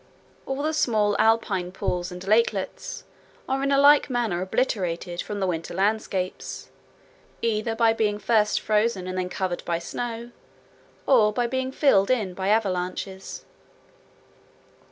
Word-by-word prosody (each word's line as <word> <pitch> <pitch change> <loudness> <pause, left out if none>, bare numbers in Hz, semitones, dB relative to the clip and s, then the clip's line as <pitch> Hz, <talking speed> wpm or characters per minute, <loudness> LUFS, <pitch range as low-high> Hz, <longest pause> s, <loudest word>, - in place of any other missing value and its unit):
All 270 +1 -2
the 310 +1 0
small 215 -8 +2
alpine 205 -5 +2
pools 180 -1 -3
and 180 +1 -8
lakelets 215 - 0 0.4
are 265 +1 0
in 275 - 0
like 280 +1 +5
manner 230 -8 -1
obliterated 185 -4 -1
from 205 -1 -5
the 195 - 0
winter 170 -2 -3
landscapes, 195 -2 -2 0.7
either 225 0 0
by 225 -1 +4
being 210 -2 0
first 210 -1 +2
frozen 210 -3 +1
and 185 0 -4
then 185 0 -2
covered 185 -2 -3
by 170 -1 -1
snow, 235 +6 -5 0.7
or 225 -6 +5
by 240 +3 0
being 260 +2 -2
filled 235 -9 +3
in 215 -8 +1
by 190 +1 -3
avalanches. 190 -2 -2
210 Hz, 135 wpm, -25 LUFS, 185-235 Hz, 0.7 s, like